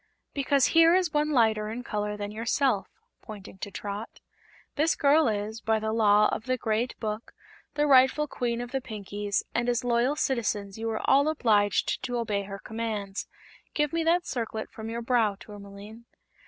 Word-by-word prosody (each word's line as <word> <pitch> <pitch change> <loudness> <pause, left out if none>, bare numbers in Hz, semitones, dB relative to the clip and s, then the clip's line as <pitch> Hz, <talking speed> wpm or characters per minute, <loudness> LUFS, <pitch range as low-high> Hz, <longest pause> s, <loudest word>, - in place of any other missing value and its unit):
"Because 280 -1 +2
here 330 +1 +6
is 365 -4 +1
one 300 0 +1
lighter 220 -6 +2
in 235 +3 -5
color 210 -2 -3
than 205 0 -5
yourself," 230 0 0 0.3
pointing 200 -3 -11
to 205 - -5
Trot. 205 +2 -6 0.6
"This 315 +3 +2
girl 295 +1 +4
is, 215 +1 -3
by 220 0 +1
the 220 0 -2
Law 210 -2 +5
of 220 - -4
the 255 0 0
Great 225 +1 -1
Book, 215 0 -5 0.4
the 295 0 +2
rightful 265 +2 +5
Queen 240 -3 -2
of 245 0 -7
the 270 0 -1
Pinkies, 205 -3 -3
and 235 +1 0
as 245 0 0
loyal 245 +3 +1
citizens 210 -8 -1
you 225 0 -2
are 220 - -3
all 280 +2 +5
obliged 215 -10 +2
to 245 -1 -3
obey 215 -4 -1
her 195 0 -7
commands. 215 -2 -4 0.5
Give 300 0 0
me 335 0 0
that 345 +2 +2
circlet 225 -3 -4
from 220 0 -7
your 235 +1 -4
brow, 230 -4 +2
Tourmaline." 205 +2 -11
225 Hz, 175 wpm, -27 LUFS, 210-265 Hz, 0.6 s, here